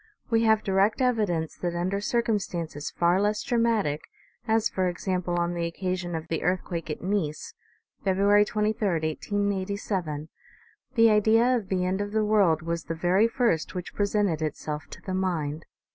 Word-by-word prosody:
We 225 Hz, 0 st, +3 dB
have 220 Hz, -1 st, +4 dB
direct 195 Hz, +4 st, +2 dB
evidence 210 Hz, -11 st, 0 dB
that 175 Hz, -1 st, -3 dB
under 185 Hz, +3 st, -1 dB
circumstances 200 Hz, -, -1 dB
far 175 Hz, +2 st, +2 dB
less 210 Hz, +1 st, 0 dB
dramatic, 225 Hz, -11 st, +1 dB, 0.5 s
as 220 Hz, 0 st, +3 dB
for 185 Hz, -1 st, -1 dB
example 180 Hz, 0 st, -2 dB
on 170 Hz, 0 st, 0 dB
the 170 Hz, -1 st, -1 dB
occasion 180 Hz, 0 st, -3 dB
of 160 Hz, 0 st, -5 dB
the 165 Hz, -1 st, -2 dB
earthquake 175 Hz, -2 st, -2 dB
at 150 Hz, -, -5 dB
Nice, 180 Hz, -6 st, -2 dB, 0.5 s
February 200 Hz, +2 st, +4 dB
23, 215 Hz, +1 st, 0 dB
1887, 185 Hz, -1 st, -2 dB, 0.7 s
the 230 Hz, -1 st, +6 dB
idea 225 Hz, +4 st, +4 dB
of 210 Hz, -6 st, -3 dB
the 185 Hz, -1 st, 0 dB
end 190 Hz, +2 st, 0 dB
of 205 Hz, 0 st, -4 dB
the 220 Hz, -1 st, +2 dB
world 195 Hz, -7 st, +3 dB
was 170 Hz, 0 st, -3 dB
the 165 Hz, -, -3 dB
very 185 Hz, +6 st, +3 dB
first 230 Hz, -10 st, 0 dB
which 180 Hz, -1 st, -5 dB
presented 200 Hz, -5 st, 0 dB
itself 150 Hz, 0 st, -4 dB
to -, -, -11 dB
the 190 Hz, -, -4 dB
mind. 160 Hz, -5 st, -2 dB
190 Hz, 160 wpm, -27 LUFS, 170-210 Hz, 0.7 s, the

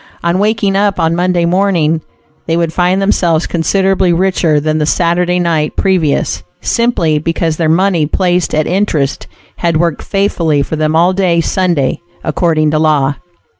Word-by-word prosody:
On 170 Hz, +2 st, 0 dB
waking 205 Hz, -1 st, 0 dB
up 200 Hz, 0 st, +1 dB
on 165 Hz, +1 st, +1 dB
Monday 175 Hz, -1 st, +1 dB
morning, 170 Hz, -3 st, +1 dB, 0.5 s
they 165 Hz, -, 0 dB
would 165 Hz, -1 st, -1 dB
find 180 Hz, +1 st, +1 dB
themselves 175 Hz, -4 st, +1 dB
considerably 190 Hz, +2 st, +1 dB
richer 170 Hz, -3 st, +1 dB
than 155 Hz, +1 st, -1 dB
the 150 Hz, -, +1 dB
Saturday 175 Hz, +2 st, +1 dB
night 165 Hz, -4 st, -1 dB
previous, 180 Hz, -7 st, 0 dB, 0.2 s
simply 175 Hz, -11 st, 0 dB
because 165 Hz, 0 st, -2 dB
their 160 Hz, -2 st, 0 dB
money 170 Hz, -2 st, +2 dB
placed 180 Hz, +1 st, 0 dB
at 155 Hz, 0 st, +1 dB
interest 165 Hz, -7 st, -1 dB, 0.3 s
had 170 Hz, -2 st, 0 dB
worked 170 Hz, -2 st, -1 dB
faithfully 170 Hz, -7 st, 0 dB
for 160 Hz, -, -4 dB
them 155 Hz, 0 st, 0 dB
all 175 Hz, +3 st, +3 dB
day 185 Hz, -3 st, +1 dB
Sunday, 170 Hz, -5 st, 0 dB, 0.2 s
according 155 Hz, -3 st, 0 dB
to 155 Hz, -, +1 dB
law! 150 Hz, -3 st, +2 dB
170 Hz, 155 wpm, -13 LUFS, 155-185 Hz, 0.5 s, all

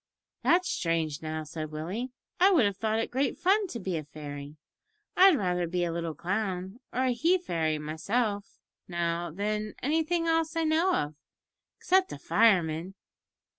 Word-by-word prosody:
"That's 360 Hz, +1 st, +3 dB
strange, 165 Hz, -3 st, -1 dB
now," 155 Hz, 0 st, -4 dB
said 155 Hz, 0 st, -6 dB
Willie, 180 Hz, +12 st, -4 dB, 0.3 s
"I 375 Hz, +2 st, +7 dB
would 330 Hz, -, +5 dB
have 200 Hz, -2 st, -1 dB
thought 220 Hz, +1 st, 0 dB
it 225 Hz, -, -2 dB
great 270 Hz, +3 st, 0 dB
fun 395 Hz, +3 st, +3 dB
to 240 Hz, -, -6 dB
be 185 Hz, -4 st, -2 dB
a 155 Hz, -, -4 dB
fairy. 145 Hz, 0 st, -8 dB, 0.6 s
I'd 370 Hz, -4 st, +7 dB
rather 180 Hz, -4 st, 0 dB
be 175 Hz, +1 st, -1 dB
a 170 Hz, -, -1 dB
little 165 Hz, -1 st, -3 dB
clown 190 Hz, +2 st, -3 dB
or 255 Hz, -, 0 dB
a 255 Hz, -, +2 dB
he 325 Hz, +10 st, +3 dB
fairy 160 Hz, -, -1 dB
myself, 200 Hz, +8 st, -2 dB, 0.3 s
now, 170 Hz, -1 st, -1 dB
than 210 Hz, +4 st, -3 dB
anything 325 Hz, +4 st, +1 dB
else 325 Hz, 0 st, +1 dB
I 330 Hz, -, +1 dB
know 325 Hz, +4 st, +3 dB
of, 150 Hz, +1 st, -1 dB, 0.6 s
except 375 Hz, 0 st, +2 dB
a -, -, -5 dB
fireman." 180 Hz, -4 st, +2 dB
195 Hz, 165 wpm, -29 LUFS, -, 0.6 s, I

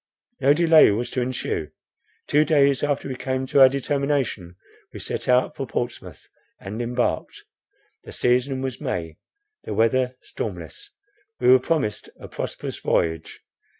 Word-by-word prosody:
No 140 Hz, +2 st, +4 dB
delay 165 Hz, -1 st, +6 dB
was 110 Hz, +4 st, -2 dB
to 130 Hz, -, -1 dB
ensue. 120 Hz, -11 st, -3 dB, 0.6 s
Two 150 Hz, +1 st, +3 dB
days 140 Hz, -4 st, +3 dB
after 145 Hz, -1 st, -1 dB
we 135 Hz, -, -4 dB
came 130 Hz, 0 st, -3 dB
to 135 Hz, +1 st, +3 dB
our 130 Hz, -, +9 dB
determination, 135 Hz, -9 st, -2 dB, 0.4 s
we -, -, -9 dB
set -, -, -4 dB
out 125 Hz, 0 st, +3 dB
for 135 Hz, -, -5 dB
Portsmouth, 120 Hz, 0 st, -5 dB, 0.3 s
and 105 Hz, +4 st, -6 dB
embarked. 120 Hz, +1 st, -2 dB, 0.6 s
The -, -, -11 dB
season 130 Hz, +2 st, +1 dB
was 130 Hz, -2 st, -4 dB
May, 80 Hz, -2 st, -4 dB, 0.5 s
the -, -, -5 dB
weather 125 Hz, +3 st, +2 dB
stormless; 415 Hz, 0 st, -7 dB, 0.5 s
we -, -, +3 dB
were 130 Hz, -, +7 dB
promised 125 Hz, -7 st, -2 dB
a -, -, -9 dB
prosperous -, -, -6 dB
voyage. 80 Hz, -1 st, -1 dB
130 Hz, 145 wpm, -23 LUFS, 120-140 Hz, 0.6 s, our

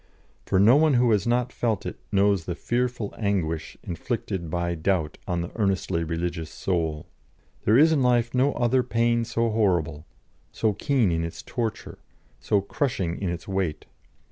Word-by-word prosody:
For 95 Hz, -, +2 dB
no 115 Hz, +7 st, +7 dB
one 155 Hz, -2 st, +4 dB
who 120 Hz, -1 st, +4 dB
has 105 Hz, 0 st, +2 dB
not 125 Hz, +1 st, +1 dB
felt 110 Hz, -5 st, -1 dB
it -, -, -5 dB
knows 100 Hz, -3 st, +2 dB
the 85 Hz, -, -3 dB
fearful 120 Hz, +1 st, -2 dB
anguish 90 Hz, -7 st, -1 dB
inflicted 90 Hz, -1 st, -4 dB
by 85 Hz, +1 st, -1 dB
doubt 80 Hz, -2 st, -1 dB
on 90 Hz, -2 st, -1 dB
the 85 Hz, -, -5 dB
earnestly 95 Hz, -5 st, 0 dB
religious 85 Hz, 0 st, -3 dB
soul. 80 Hz, -3 st, -2 dB, 0.6 s
There 110 Hz, +3 st, +5 dB
is 160 Hz, +4 st, +6 dB
in 150 Hz, -4 st, +2 dB
life 120 Hz, -2 st, +2 dB
no 130 Hz, +3 st, +2 dB
other 125 Hz, +2 st, +2 dB
pain 115 Hz, -1 st, +1 dB
so 115 Hz, 0 st, 0 dB
horrible, 85 Hz, -8 st, 0 dB, 0.4 s
so 110 Hz, -2 st, 0 dB
keen 125 Hz, -, +1 dB
in 80 Hz, 0 st, 0 dB
its 85 Hz, -, -6 dB
torture, 115 Hz, -4 st, -4 dB, 0.4 s
so 100 Hz, -, +1 dB
crushing 100 Hz, -, -2 dB
in 95 Hz, -, -1 dB
its 85 Hz, -1 st, -5 dB
weight. 95 Hz, -5 st, -2 dB
100 Hz, 165 wpm, -25 LUFS, 85-120 Hz, 0.6 s, no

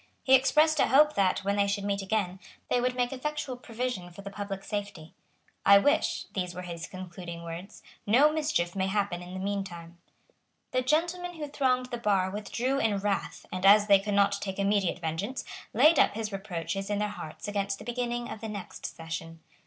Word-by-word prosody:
He 265 Hz, -, +3 dB
expressed 300 Hz, +4 st, +5 dB
a -, -, +4 dB
hope 300 Hz, +3 st, +5 dB
that, 190 Hz, -1 st, +1 dB
when 200 Hz, +1 st, 0 dB
they 200 Hz, 0 st, +3 dB
should 200 Hz, 0 st, -1 dB
meet 200 Hz, 0 st, -1 dB
again, 190 Hz, -2 st, -1 dB, 0.3 s
they 245 Hz, -, +3 dB
would 250 Hz, 0 st, 0 dB
make 245 Hz, +1 st, 0 dB
effectual 300 Hz, 0 st, -3 dB
provision 240 Hz, -6 st, -4 dB
for 175 Hz, +3 st, -12 dB
the 200 Hz, -, -7 dB
public 200 Hz, -1 st, -5 dB
safety. 200 Hz, -7 st, -5 dB, 0.5 s
"I 200 Hz, 0 st, +8 dB
wish," 290 Hz, +10 st, +2 dB
these 180 Hz, -2 st, -3 dB
were 180 Hz, -, -6 dB
his 170 Hz, -2 st, -6 dB
concluding 175 Hz, -2 st, -8 dB
words, 170 Hz, +4 st, -8 dB, 0.2 s
"no 280 Hz, +8 st, +5 dB
mischief 295 Hz, -, 0 dB
may 190 Hz, -1 st, 0 dB
happen 195 Hz, -3 st, -1 dB
in 180 Hz, +1 st, -8 dB
the -, -, -4 dB
mean 200 Hz, +1 st, -1 dB
time." 170 Hz, -2 st, -10 dB, 0.7 s
The 255 Hz, -, +1 dB
gentlemen 345 Hz, +6 st, 0 dB
who 305 Hz, -2 st, -5 dB
thronged 255 Hz, -3 st, 0 dB
the 240 Hz, -, -3 dB
bar 195 Hz, -4 st, +1 dB
withdrew 235 Hz, +6 st, -1 dB
in 220 Hz, -5 st, +1 dB
wrath, 200 Hz, 0 st, -2 dB
and, 185 Hz, 0 st, -4 dB
as 205 Hz, +1 st, +7 dB
they 200 Hz, -2 st, +6 dB
could 205 Hz, +1 st, -2 dB
not 200 Hz, 0 st, +3 dB
take 190 Hz, -1 st, -4 dB
immediate 200 Hz, -2 st, +1 dB
vengeance, 180 Hz, +9 st, -3 dB, 0.3 s
laid 300 Hz, +8 st, +5 dB
up -, -, +4 dB
his 220 Hz, -1 st, -3 dB
reproaches 195 Hz, -1 st, -4 dB
in 205 Hz, -, 0 dB
their 210 Hz, 0 st, 0 dB
hearts 160 Hz, -5 st, -8 dB
against 200 Hz, -1 st, -1 dB
the -, -, -11 dB
beginning 240 Hz, 0 st, -2 dB
of 220 Hz, -, -7 dB
the 220 Hz, -, -5 dB
next 205 Hz, -3 st, -6 dB
session. 165 Hz, 0 st, -7 dB
200 Hz, 200 wpm, -29 LUFS, 185-250 Hz, 0.7 s, I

